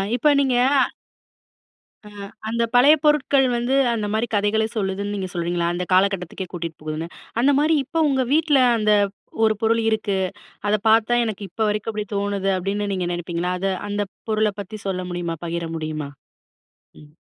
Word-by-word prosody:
இப்போ 295 +5 +3
நீங்க 265 -3 +2 1.5
ஆ - - -11 0.4
அந்த 235 +1 0
பழைய 280 +5 +7
பொருட்கள் 285 -2 +3
வந்து 240 +2 -1 0.2
அந்த 215 -2 -2
மாரி 220 +2 0
கதைகளை 210 +2 +1
சொல்லுதுன்னு 200 0 -2
நீங்க 190 -2 -3
சொல்றீங்களா? 170 0 -1
அந்த 180 - -2
காலகட்டத்துக்கே 190 -1 +1
கூட்டிட்டு 165 -3 -5
போகுதுன்னு. 155 +1 -4 0.3
அந்த 270 +4 +4
மாரி 305 +3 +3
இப்போ 330 +5 -3
உங்க 265 -1 +1
வீட்ல 305 -3 +3 0.2
அந்த 215 -1 +3 0.5
ஒரு 215 - +3
பொருள் 230 +1 +2
இருக்கு. 215 -3 0 0.5
அத 210 - +3
பார்த்தா 225 +2 +4
எனக்கு 215 -2 -4
இப்போ 220 +6 -2
வரைக்கும் 210 +2 -2
அப்படி 210 0 -3
தோணுது 200 -1 -1
அப்படின்னு 200 +2 -2
நீங்க 180 -2 -2
நினைப்பீங்களா? 175 +1 -3
அத 195 - -3 0.2
அந்த 205 0 -1 0.3
பொருள 215 -1 +2
பத்தி 210 +2 -8
சொல்ல 185 -1 -2
முடியுமா 175 -1 -3
பகிர 170 0 -3
முடியுமா? 155 -2 -4 0.9
ம். 150 - -15
205 Hz, 155 wpm, -22 LUFS, 180-230 Hz, 1.5 s, பழைய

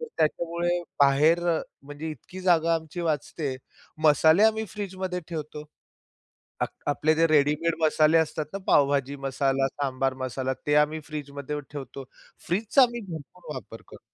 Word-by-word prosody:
तर 475 - -5
त्याच्यामुळे 170 +2 0 0.2
बाहेर 145 +5 +5 0.4
म्हणजे 145 +3 -7
इतकी 180 +4 -10
जागा 170 -2 +3
आमची 160 +1 -4
वाचते. 150 -3 -2 0.5
मसाले 160 +5 +5
आम्ही 220 0 +2
फ्रीजमध्ये 190 -2 -4
ठेवतो. 150 -2 -6 1.0
आप - - +1 0.2
आपले 155 +2 +2
जे 165 +1 +4
रेडीमेड 155 +2 +2
मसाले 155 +1 +4
असतात 155 -1 0
ना, 195 - -3
पावभाजी 140 -1 +3
मसाला, 135 0 0
सांबार 135 -2 -2
मसाला 130 +1 -2
ते 145 - +2
आम्ही 155 +1 -6
फ्रीजमध्ये 145 -1 -5
ठेवतो. 135 -1 -7 0.4
फ्रीजचा 215 +9 +3
आम्ही 240 -1 +1
भरपूर 160 - -8
वापर - - -9
करतो. - - -13
155 Hz, 135 wpm, -26 LUFS, 140-170 Hz, 1.0 s, बाहेर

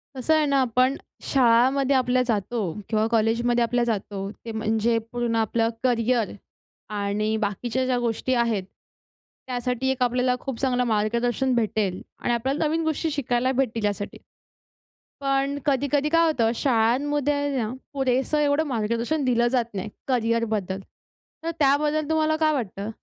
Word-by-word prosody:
कसं 265 +5 +1
आहे 310 - +3
ना 280 -1 +2
आपण 255 +2 +2 0.3
शाळामध्ये 260 +2 +3
आपल्या 255 -1 +2
जातो 230 0 -1 0.3
किंवा 215 -1 +2
कॉलेजमध्ये 235 +2 +2
आपल्या 240 +1 +1
जातो, 200 -3 -3
ते 225 +1 -9
म्हणजे 220 +1 +1
पूर्ण 240 -1 -1
आपलं 225 +1 +1
करियर 240 -2 +1 0.7
आणि 210 +2 0
बाकीच्या 230 +5 -1
ज्या 255 -1 +1
गोष्टी 240 +2 -1
आहेत 230 -5 +1 0.8
त्यासाठी 250 +1 -1
एक 255 -1 0
आपल्याला 250 +1 +1
खूप 265 -3 -5
चांगलं 250 -2 +1
मार्गदर्शन 235 +3 +1
भेटेल 215 -5 0 0.2
आणि 240 - 0
आपल्याला 265 +6 0
नवीन 325 +2 0
गोष्टी 315 0 -1
शिकायला 255 -3 0
भेटतील 240 -4 0
यासाठी. 205 0 -3 1.0
पण 275 +1 0
कधी-कधी 285 +1 +1
काय 330 +1 +4
होतं, 235 -8 +2
शाळांमध्ये 285 +4 +1
ना 220 -4 -1 0.2
पुरेसं 265 +1 +1
एवढं 290 +1 +2
मार्गदर्शन 235 +4 -1
दिलं 240 -1 +3
जात 240 -2 0
नाही 200 +1 -4 0.2
करियरबद्दल. 230 -6 0 0.6
तर 330 - -1
त्याबद्दल 295 +2 +2
तुम्हाला 315 0 +2
काय 310 -1 +3
वाटतं? 210 -6 -3
245 Hz, 140 wpm, -24 LUFS, 225-275 Hz, 1.0 s, काय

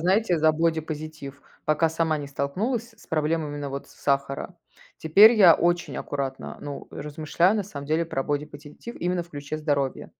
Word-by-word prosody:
знаете, 185 +2 +2
за 155 0 +5
бодипозитив. 155 -3 -3 0.2
Пока 155 +2 +2
сама 160 -1 0
не 145 - -6
столкнулась 210 - -2
с - - -19
проблемами, 155 -1 -1
на 145 -1 -4
вот, 140 +1 -6
сахара. 140 +5 -2 0.4
Теперь 205 +9 +7
я 185 -6 +8
очень 175 0 0
аккуратно, 135 -2 -4
ну, 145 -1 -7
размышляю, 155 +6 0
на 210 - 0
самом 145 -7 -8
деле, 160 +3 +1
про 135 -5 -3
бодипозитив 145 +8 -6
именно 175 0 -1
в 170 - -18
ключе 145 0 -5
здоровья. 145 -3 -1
155 Hz, 160 wpm, -25 LUFS, 145-175 Hz, 0.4 s, я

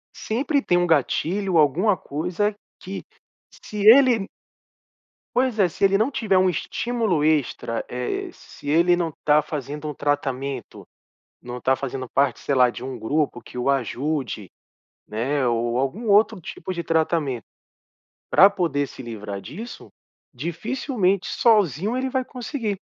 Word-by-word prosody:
sempre 275 +6 0
tem 175 - +2
um 175 0 +2
gatilho, 170 +5 +1
alguma 175 +7 +3
coisa 180 +9 -2 0.3
que 190 +2 -7 0.6
se 210 -1 -4
ele 235 -3 +7 1.1
Pois 250 -3 +1
é, 195 - +4
se 175 - -6
ele 195 0 +5
não 220 +7 +1
tiver 210 -8 +2
estímulo 215 -1 -1
extra, 145 -6 0
eh, 125 0 -3
se 145 - -11
ele 170 +3 +4
não 170 -2 -1
tá 150 0 +5
fazendo 150 0 -5
um - - -4
tratamento, 140 -1 -3 0.5
não 125 0 -7
tá 130 +1 +2
fazendo 130 -1 -5
parte, 135 0 +1
sei 140 - -1
lá, 125 -1 +5
de 120 +1 -7
um 130 - -5
grupo 145 +1 -1
que - - -13
o 125 +3 +1
ajude, 130 - -2 0.6
né, 130 +5 -1
ou 120 0 0
algum 175 - -2
outro 210 0 +4
tipo 185 +3 -6
de 170 -1 -4
tratamento 160 - 0 0.9
pra 195 - +8
poder 160 -8 -1
se 130 - -10
livrar 105 -4 -6
disso, 195 - -9 0.4
dificilmente 195 - -1
sozinho 210 - +2
ele 265 0 -1
vai 260 0 -1
conseguir 240 -5 -4
160 Hz, 140 wpm, -23 LUFS, 135-205 Hz, 1.1 s, pra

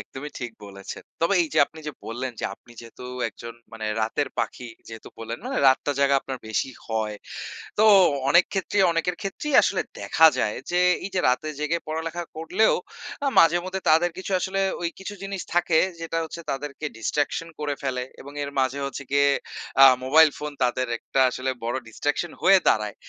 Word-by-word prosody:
একদমই 145 +3 -8
ঠিক 120 -2 -5
বলেছেন। 100 0 -9 0.2
তবে 170 +4 +2
এই 160 - -3
যে - - +3
আপনি 160 +2 -13
যে 150 - -3
বললেন 125 +3 -4
যে - - -4
আপনি 120 - -20
যেহেতু 115 +2 -12 0.2
একজন 115 +1 -10 0.2
মানে 110 -1 -5
রাতের 125 +6 0
পাখি। 125 -1 -3 0.2
যেহেতু 115 -1 -10
বললেন 115 +1 -5
মানে - - -2
রাতটা 140 +2 +2
জাগা 140 0 +4
আপনার 130 -1 -6
বেশি 120 +4 -1 0.2
হয়, 110 -2 -2 0.6
তো 215 - +5 0.4
অনেক 170 +5 +6
ক্ষেত্রেই 195 0 +1
অনেকের 165 +2 -1
ক্ষেত্রেই 260 +9 -3
আসলে - - +1 0.2
দেখা 160 - +5
যায়, 105 - 0
যে 180 0 +2 0.2
এই 200 - -4
যে 180 - +2
রাতে 130 +5 +1
জেগে 155 +3 0
পড়ালেখা 160 +2 -3
করলেও 165 +7 +2 0.5
আ - - +1
মাঝেমধ্যে 175 +3 +3
তাদের 170 +3 +4
কিছু 190 - -5
আসলে 195 +2 -1 0.2
ওই 170 - 0
কিছু 200 +2 -7
জিনিস 195 -1 -4
থাকে, 175 -2 +3 0.2
যেটা 165 0 -2
হচ্ছে 170 +1 -8
তাদেরকে 145 +2 -5
ডিস্ট্রাকশন 145 +7 -1
করে 145 -1 -1
ফেলে 130 -2 -2 0.2
এবং 140 - -10
এর 140 - -5
মাঝে 130 +1 0
হচ্ছে 140 +1 -6
গিয়ে 140 0 +4 0.5
আ - - +12 0.2
মোবাইল 155 +4 +7
ফোন 150 0 -5
তাদের 125 +1 0
একটা 135 - -1
আসলে 130 +1 -2
বড় 120 +2 -1
ডিস্ট্রাকশন 145 +8 -2
হয়ে 195 0 +7
দাঁড়ায়। 105 -2 +1
145 Hz, 180 wpm, -24 LUFS, 125-170 Hz, 0.6 s, আ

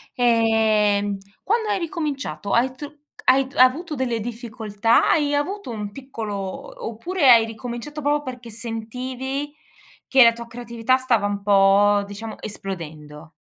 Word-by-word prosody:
Ehm, 220 -4 +2 0.3
quando 445 +1 0
hai 400 -2 +1
ricominciato 280 - -4
hai 255 +2 +2
tru 290 +2 -7 0.3
c - - -15
hai 265 0 +5
d 275 - -17
avuto 295 +6 +3
delle 245 -3 -1
difficoltà? 225 -1 0
Hai 295 -3 +2
avuto 375 +3 -3
un 210 -2 -5
piccolo 230 -5 -6 0.5
oppure 280 +6 +1
hai 230 -2 +7
ricominciato 240 +6 -7
proprio 290 +1 +1
perché 250 -3 -8
sentivi 250 +5 -5 0.5
che 265 -1 +7
la 230 0 +6
tua 235 0 -9
creatività 235 +1 -1
stava 245 -5 +1
un 200 0 -3
po' 200 +1 +4
diciamo 205 +2 -8
esplodendo? 160 -6 -8
235 Hz, 140 wpm, -22 LUFS, 210-265 Hz, 0.5 s, hai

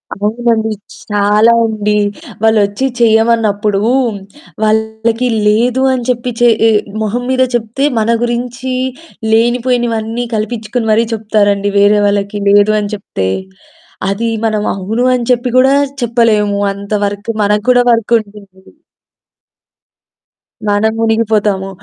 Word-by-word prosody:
అవునండి. 220 +1 -1 0.4
చాలా 210 +2 +3
ఉండి. 210 -1 -1 0.5
వాళ్ళొచ్చి 220 +2 +2
చేయమన్నప్పుడు 220 -3 +2 0.8
వాళ్ళకి 220 +2 0 0.2
లేదు 240 +5 +2
అని 250 -2 -2
చెప్పి 245 0 -1
చేయి 225 -1 +4 0.3
మొహం 220 +3 -2
మీద 260 0 +2
చెప్తే, 235 +4 -2 0.2
మన 220 - 0
గురించి 245 +2 -3 0.6
లేనిపోయినవన్నీ 240 -1 0
కల్పిచ్చుకొని 220 +1 -3
మరీ 225 +2 +3
చెప్తారండి 205 -2 0
వేరే 205 +1 +4
వాళ్ళకి 200 0 -1
లేదు 205 +1 +4
అని 205 0 -4
చెప్తే. 95 - -4 0.8
అది 210 +4 -2 0.2
మనం 215 -1 -1
అవును 215 +6 -2
అని 245 -1 -1
చెప్పి 245 +1 +1
గూడా 265 +2 +5 0.3
చెప్పలేము 215 -4 +1
అంత 200 +1 -11
వరకు. 205 +2 -5
మనకు 210 0 +1
కూడా 245 0 +4
వర్కుంటుంది. 210 -4 -2 2.1
మనం 205 +2 +2
మునిగిపోతాము. 215 -3 0
220 Hz, 105 wpm, -13 LUFS, 205-235 Hz, 2.1 s, గూడా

